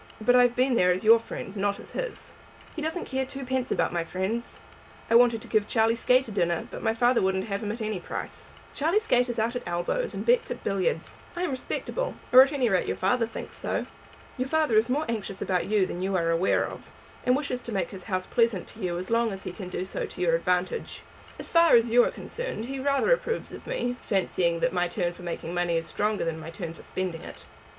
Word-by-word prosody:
But 225 +3 +3
I 250 - +7
have 245 -1 +3
been 255 +1 +2
there 180 -6 +4
as 185 +4 +1
your 230 +1 +8
friend, 205 -3 -7
not 200 0 0
as - - -10
his." - - -5 0.4
"He 325 - -4
doesn't 320 +3 -2
care 265 0 -1
twopence 260 -1 -3
about - - +1
my 170 -1 0
friends. 190 +7 -3 0.5
I - - +4
wanted 235 -1 +5
to - - -12
give 215 -2 +1
Charlie 225 0 +3
Skate 250 +2 +3
a - - -7
dinner, 175 -4 0
but - - -7
my 225 -1 +1
father 240 +1 +3
wouldn't 190 0 +1
have 200 0 -2
him 210 -1 -2
at 225 +2 -6
any 215 -3 -2
price." - - -6 0.2
"Charlie 330 +8 +2
Skate 250 - +2
is 240 - -3
out 230 +2 0
at 245 - -2
elbows, 175 - -1
and - - -4
bets 485 0 +3
at - - -5
billiards. 185 -5 -1 0.2
I 350 - -2
am 350 - 0
respectable, - - -3 0.2
or 255 - +11
at 270 +2 +5
any 270 -4 +1
rate 190 -4 +1
your - - -2
father 225 +5 +1
thinks 230 - -8
so. - - -2 0.5
Your 255 0 -1
father 310 -4 +1
is 220 +3 +4
more 295 +5 +1
anxious 210 -4 -4
about 180 -2 0
you 205 -2 +3
than 180 - -5
you 190 +1 0
are 165 -2 +2
aware 165 +3 +2
of, - - -9 0.3
and 250 - +3
wishes 265 -3 -2
to 235 - -8
make 195 -3 -1
his 190 -2 -9
house 185 -3 -2
pleasant 230 -6 +1
to 225 - -14
you 180 -4 -2
as 185 +4 -5
long 230 -1 +2
as 195 -1 -6
he - - -4
can 185 -1 -7
do 185 - -3
so - - -4
to - - -12
your 175 -2 +2
advantage. 180 - -1 0.3
As - - -8
far 335 -3 +6
as 230 0 +4
you 245 +1 +7
are - - +1
concerned 485 - -5
he 270 +2 -5
rather 275 - +2
approves 475 -1 -2
of - - -10
me, 245 - -2
fancying 175 -4 0
that 170 +1 +1
my 175 -1 +1
turn 175 0 -2
for 175 - -13
making 170 -1 -5
money 175 -1 +1
is 165 - -2
stronger 210 +2 -1
than 165 -1 -2
my 160 +1 -8
turn 165 -1 -6
for - - -13
spending 180 -3 -4
it. 75 - -11
220 Hz, 245 wpm, -27 LUFS, 180-250 Hz, 0.5 s, or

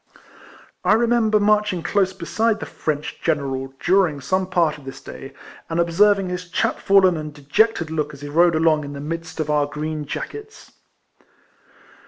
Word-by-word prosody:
I - - +4
remember 225 -1 +3
marching 210 -4 +2
close 190 +1 +1
beside 195 +5 -1
the - - -5
French 150 -1 -4
general 135 -4 -2
during 180 -5 +2
some 185 +7 -1
part 170 -5 +1
of - - -16
this 135 0 -9
day, 135 - -10 0.4
and 165 +1 -1
observing 195 +3 +3
his 180 0 -5
chap - - 0
fallen 190 -3 +4
and 155 -1 -6
dejected 165 +5 0
look 150 -2 -2
as 140 -1 -13
he 145 - -6
rode 170 +3 +3
along 155 -1 +3
in 145 0 -7
the 140 - -7
midst 165 +3 -6
of 155 - 0
the 150 -1 +1
green 150 +1 -4
jackets. 435 - -7
165 Hz, 165 wpm, -21 LUFS, 150-195 Hz, 0.4 s, I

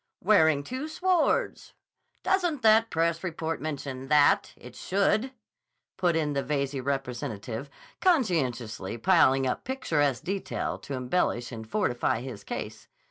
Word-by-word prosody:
"Wearing 160 -7 +4
two 260 - -5
swords. 350 +1 0 0.5
Doesn't 355 -7 +1
the 220 +1 +6
press 165 +1 0
report 165 -2 -3
mention 140 -3 -5
that? 150 0 +4
It - - -13
should," 205 +6 +1 0.6
put 175 -3 +1
in 150 -2 0
the 140 - 0
Veyze 140 0 -1
representative 125 -2 -4 0.3
conscientiously 130 - 0
piling 135 -3 +4
up 125 - -2
picturesque 150 - 0
detail 195 +1 -3
to 140 - -6
embellish 125 -2 -1
and 110 -2 -8
fortify 120 - 0
his 120 -6 -8
case. - - -6
150 Hz, 125 wpm, -27 LUFS, 130-200 Hz, 0.6 s, the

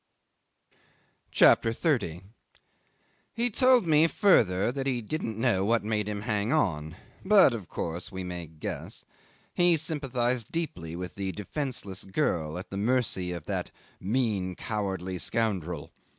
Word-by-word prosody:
CHAPTER 115 - +5
30 115 - 0 1.1
'He 235 +1 0
told 255 -1 +4
me 160 0 +5
further 110 - +3
that 135 +1 -3
he 130 -3 0
didn't 115 -2 -4
know 115 -5 +2
what 115 +2 +2
made 105 -1 -1
him 105 -1 -3
hang 105 0 -1
on 80 - 0 0.3
but 195 -9 +6
of 105 -7 -6
course 85 +5 -4
we 95 -1 -5
may 90 -2 -5
guess. 75 0 -7 0.5
He 175 -1 +4
sympathised 130 -7 -1
deeply 90 - -3
with 90 0 -6
the 95 -1 -4
defenceless 105 -3 -4
girl, 90 - -1
at 90 - -8
the 100 - -4
mercy 105 -5 0
of 85 -3 -6
that - - -3 0.3
"mean, 100 -4 -1
cowardly 95 -4 -3
scoundrel." 90 -10 -2
105 Hz, 135 wpm, -28 LUFS, 90-135 Hz, 1.1 s, but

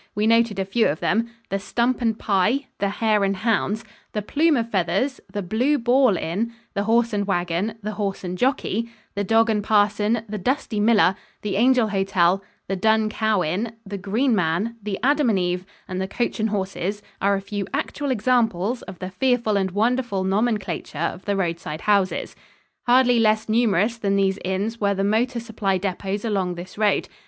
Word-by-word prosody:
We 210 +1 +1
noted 230 -1 +3
a 195 - -1
few 220 +4 +2
of 150 - -1
them. 230 +4 +1 0.2
The 195 - -1
"Stump 240 +5 0
and 225 -2 +1
Pie," 215 +8 +1
the 200 - +1
"Hare 210 0 +1
and 195 0 +1
Hounds," 220 +1 0 0.3
the 210 - -2
"Plume 305 +6 +2
of 230 0 -2
Feathers," 195 +9 0
the 205 0 -3
"Blue 245 +11 +1
Ball 245 -4 +3
Inn," 200 +10 -2 0.2
the 200 -1 -1
"Horse 230 +1 +2
and 200 -1 -1
Wagon," 180 +3 -1
the 210 - -2
"Horse 200 -2 -3
and 180 0 -4
Jockey," 230 -1 0 0.2
the 200 - -1
"Dog 225 +3 +3
and 210 -1 0
Parson," 210 +1 +2
the 210 0 -5
"Dusty 250 0 -1
Miller," 205 -3 +4 0.3
the 205 -2 -2
"Angel 245 +1 +4
Hotel" 195 -1 +2 0.2
the 195 - -1
"Dun 220 +3 +2
Cow 215 -3 +1
Inn," 200 +9 -2
the 200 0 -6
"Green 225 +7 +1
Man," 180 +6 0
the 200 -1 -3
"Adam 285 -1 +3
and 210 - +2
Eve," 180 0 -1 0.2
and 185 0 -3
the 190 - -2
"Coach 240 +3 -2
and 220 +1 +1
Horses," 200 0 -3 0.2
are 200 +1 +3
a - - -1
few 200 0 -4
actual 285 0 -2
examples 235 -2 +1
of 190 -2 -10
the 185 +2 -6
fearful 235 +1 +1
and 190 -1 +1
wonderful 225 0 0
nomenclature 195 -5 -1
of 170 +3 -3
the 200 - 0
roadside 170 -4 -3
houses. 200 -3 +1 0.5
Hardly 245 -1 +5
less 215 -1 +2
numerous 220 -1 +2
than 200 -2 +1
these 195 0 +1
inns 200 +5 -2
were 200 -1 +2
the 195 - -1
motor 235 +5 +1
supply 215 -4 -1
depots 195 +2 -3
along 190 -5 -1
this 175 +2 -9
road. 210 -1 +1
210 Hz, 185 wpm, -23 LUFS, 195-230 Hz, 0.5 s, Hardly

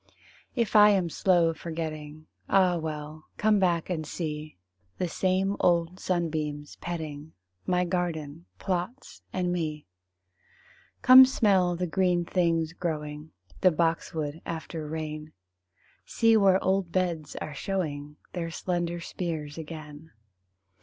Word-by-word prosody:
If 230 -4 0
I 210 0 +9
am 185 -5 +2
slow 175 -2 +3
forgetting 155 -2 -6 0.2
Ah, 185 -2 +4
well, 155 -1 -5
come 215 -1 +3
back 175 -3 +1
and 170 -4 -2
see 155 - -5 0.4
The 180 - -1
same 190 +3 0
old 175 +1 +2
sunbeams 155 -4 -2
petting 160 -3 -6 0.3
My 180 0 +2
garden 170 -3 -3
plots 190 +8 -4
and 180 -1 -1
me. 155 -3 -3 1.2
Come 255 +1 +11
smell 195 -8 +3
the 180 +1 -1
green 180 0 +1
things 165 -3 +1
growing, 150 -3 -4 0.3
The 185 - +6
boxwood 165 -2 -1
after 160 -1 -5
rain; 155 0 -5 0.7
See 225 -1 +3
where 195 -3 +5
old 190 -2 +1
beds 170 -5 -1
are 155 - -5
showing 150 -4 -3 0.2
Their 170 -2 -3
slender 175 0 -2
spears 160 -4 -4
again. 155 -1 -9
170 Hz, 120 wpm, -28 LUFS, 155-185 Hz, 1.2 s, Come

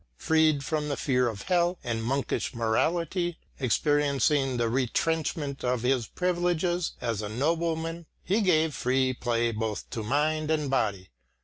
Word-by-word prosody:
Freed 155 - +2
from 150 -1 -1
the 140 - -2
fear 125 -2 +1
of 105 -4 -4
hell 175 0 +1
and 115 -2 -2
monkish 135 +1 -1
morality, 170 - 0 0.2
experiencing 140 0 +2
the 120 -1 +1
retrenchment 140 +4 -1
of 125 -1 0
his 125 -2 +1
privileges 175 -1 0
as 115 -3 -1
a 105 - -4
nobleman, 165 +5 -1 0.2
he 205 +5 +1
gave 160 -5 +3
free 130 +1 +1
play 120 -1 0
both 110 -1 -3
to 115 - -3
mind 150 +6 0
and 150 -3 0
body. 100 - -1
140 Hz, 140 wpm, -27 LUFS, 120-160 Hz, 0.2 s, gave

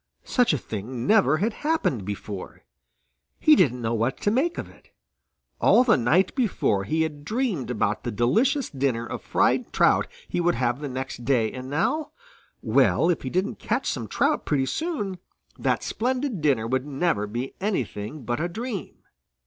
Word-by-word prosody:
Such 245 -2 +3
a 150 - +1
thing 115 +2 -5
never 190 -6 +4
had 210 +6 0
happened 300 - 0
before. 100 -1 -6 0.8
He 310 - +6
didn't 125 - +2
know 115 +1 0
what 115 +4 0
to 205 - +2
make 290 +9 +1
of - - -4
it. - - -20 0.7
All 250 - +6
the 240 -4 +4
night 155 +10 +2
before 175 - +1
he 160 +9 +1
had 150 -2 -5
dreamed 200 - -1
about 110 -3 -1
the 120 - -2
delicious 225 - +2
dinner 130 -4 -1
of - - -6
fried - - +1
trout - - +3 0.2
he 175 - -1
would 175 0 +2
have 120 +1 0
the 145 -1 -4
next 130 -1 -5
day, 115 -3 +2
and 130 0 -7
now 295 - -1 0.5
well, 170 - +3
if 170 - -2
he 130 - -4
didn't 185 +7 -1
catch 240 +5 -1
some 115 -5 -2
trout - - +1
pretty 135 -3 +1
soon, 210 - -3 0.4
that - - 0
splendid 255 - -1
dinner 135 -7 +2
would 130 +4 -1
never 140 -7 0
be 120 +5 -4
anything 140 - -3
but 120 +1 -2
a 170 +3 -1
dream. 225 +1 -6
145 Hz, 175 wpm, -25 LUFS, -, 0.8 s, He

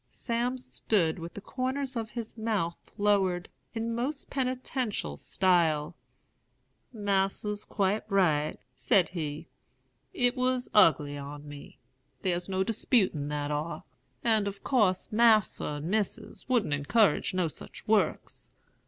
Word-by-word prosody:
"Sam 240 +2 -2
stood 185 -9 0
with 170 +1 -8
the 205 - -7
corners 260 +4 -3
of 225 -2 -3
his 235 -2 -6
mouth 215 -7 -2
lowered, 195 -3 +2 0.3
in 230 +1 -2
most 270 +5 -3
penitential 255 - -2
style. 165 - +1 1.0
'Mas'r's 205 -1 -1
quite 200 +1 0
right,' 160 -7 +2
said 145 +8 +2
he. 155 -4 -5 0.6
'It 245 0 +1
was 255 -1 0
ugly 150 -7 +4
on 145 +1 -8
me; 145 -1 -11 0.5
thar's 180 -1 -1
no 190 0 +1
disputin' 195 - +1
that 145 0 -2
ar; 150 +3 -3 0.4
and 220 -3 +3
of 200 0 -6
course 210 -9 +2
Mas'r 215 -8 +3
and 145 - -6
Missis 210 +6 -2
wouldn't 230 - +2
encourage 190 +8 +2
no 180 -2 +2
such 155 - -11
works. 210 -7 0
200 Hz, 125 wpm, -29 LUFS, 165-230 Hz, 1.0 s, ugly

